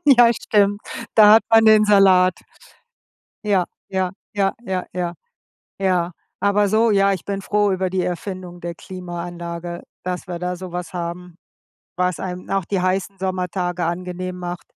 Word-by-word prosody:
Ja, 240 Hz, -4 st, +7 dB
stimmt. 205 Hz, -3 st, +1 dB, 0.3 s
Da 210 Hz, -1 st, +8 dB
hat 225 Hz, -, +6 dB
man 225 Hz, 0 st, +6 dB
den 215 Hz, -1 st, +7 dB
Salat. 190 Hz, -3 st, +5 dB, 1.1 s
Ja, 200 Hz, -4 st, +2 dB, 0.2 s
ja, 190 Hz, -1 st, -1 dB, 0.2 s
ja, 195 Hz, -1 st, +2 dB
ja, 185 Hz, -1 st, -2 dB
ja. 175 Hz, -1 st, -3 dB, 0.7 s
Ja, 180 Hz, -2 st, +1 dB, 0.3 s
aber 205 Hz, 0 st, +3 dB
so 220 Hz, +3 st, +3 dB
ja, 195 Hz, -1 st, +4 dB
ich 185 Hz, -3 st, -4 dB
bin 200 Hz, -1 st, -3 dB
froh 205 Hz, 0 st, +1 dB
über 185 Hz, 0 st, -1 dB
die 185 Hz, 0 st, 0 dB
Erfindung 180 Hz, 0 st, -5 dB
der 170 Hz, 0 st, -5 dB
Klimaanlage, 175 Hz, -1 st, -6 dB, 0.2 s
dass 180 Hz, 0 st, -4 dB
wir 175 Hz, -, -4 dB
da 180 Hz, +1 st, -3 dB
so 185 Hz, 0 st, -8 dB
was 180 Hz, 0 st, -5 dB
haben, 175 Hz, 0 st, -5 dB, 0.6 s
was 180 Hz, -1 st, 0 dB
einem 180 Hz, -1 st, -6 dB
auch 195 Hz, -2 st, 0 dB
die 195 Hz, +2 st, -1 dB
heißen 190 Hz, +1 st, -1 dB
Sommertage 180 Hz, -1 st, -2 dB
angenehm 180 Hz, +1 st, -4 dB
macht. 175 Hz, -1 st, -6 dB
185 Hz, 155 wpm, -21 LUFS, 180-200 Hz, 1.1 s, Da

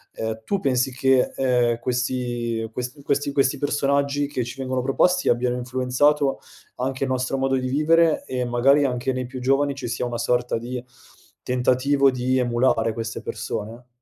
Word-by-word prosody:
Ehm, 110 Hz, 0 st, -4 dB
tu 200 Hz, -, -1 dB
pensi 130 Hz, -4 st, +1 dB
che, 130 Hz, 0 st, +2 dB
ehm, 125 Hz, -3 st, +1 dB
questi 120 Hz, -2 st, -2 dB
ques 125 Hz, +4 st, -5 dB
questi 140 Hz, 0 st, 0 dB
questi 135 Hz, 0 st, +1 dB
personaggi 140 Hz, 0 st, 0 dB
che 135 Hz, -3 st, -2 dB
ci 120 Hz, +3 st, -8 dB
vengono 130 Hz, -1 st, -1 dB
proposti 180 Hz, +7 st, +2 dB
abbiano 120 Hz, +1 st, +1 dB
influenzato 130 Hz, +3 st, +1 dB, 0.4 s
anche 130 Hz, +1 st, -2 dB
il -, -, -4 dB
nostro 130 Hz, +1 st, -1 dB
modo 135 Hz, 0 st, +1 dB
di 130 Hz, -1 st, -1 dB
vivere 160 Hz, +3 st, +3 dB
e 125 Hz, -1 st, -2 dB
magari 125 Hz, +4 st, +3 dB
anche 130 Hz, -1 st, -1 dB
nei 130 Hz, 0 st, -3 dB
più 130 Hz, +1 st, -7 dB
giovani 135 Hz, +2 st, +1 dB
ci 135 Hz, -3 st, -5 dB
sia 120 Hz, -, -2 dB
una 120 Hz, -1 st, -3 dB
sorta 120 Hz, 0 st, 0 dB
di, 120 Hz, +2 st, -5 dB, 0.6 s
tentativo 130 Hz, +2 st, +2 dB
di 130 Hz, 0 st, 0 dB
emulare 120 Hz, -2 st, +2 dB
queste 110 Hz, 0 st, -5 dB
persone? 115 Hz, +3 st, -6 dB
130 Hz, 165 wpm, -23 LUFS, 125-135 Hz, 0.6 s, vivere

